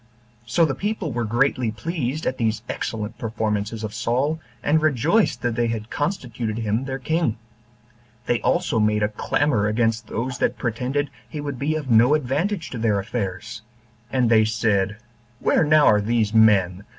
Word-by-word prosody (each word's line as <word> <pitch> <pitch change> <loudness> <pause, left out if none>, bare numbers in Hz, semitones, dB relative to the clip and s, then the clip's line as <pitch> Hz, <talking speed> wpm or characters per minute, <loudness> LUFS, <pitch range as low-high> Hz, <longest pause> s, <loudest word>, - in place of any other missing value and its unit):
So 165 +8 +3
the 140 - -1
people 205 -3 -3
were 120 -1 -2
greatly 120 +1 +1
pleased 150 +4 -3
at 130 - -2
these 110 -1 0
excellent 110 0 -4
performances 110 -1 -2
of 105 -1 -4
Saul, 125 +7 0 0.2
and 155 +2 +3
rejoiced 155 - +2
that 120 -1 0
they 120 0 0
had 115 -1 -4
constituted 125 - -3
him 110 +3 -1
their 135 0 -3
king. 145 -3 0 0.9
They 120 -1 0
also 170 -10 +1
made 105 0 +2
a 105 - +2
clamor 110 0 0
against 115 0 0
those 125 +3 -3
that - - 0
pretended 130 +5 -2 0.2
he 150 - -6
would 145 -3 -5
be 155 +3 0
of 145 -5 -3
no 120 +6 +6
advantage 155 +7 -1
to 125 - -5
their 110 -3 +2
affairs; 100 +1 -4 0.5
and 125 -2 +2
they 110 -1 +6
said, 110 -2 0 0.4
Where - - +3
now 155 0 +5
are 105 0 +5
these 110 0 0
men? 100 -4 +4
120 Hz, 165 wpm, -23 LUFS, 110-145 Hz, 0.9 s, no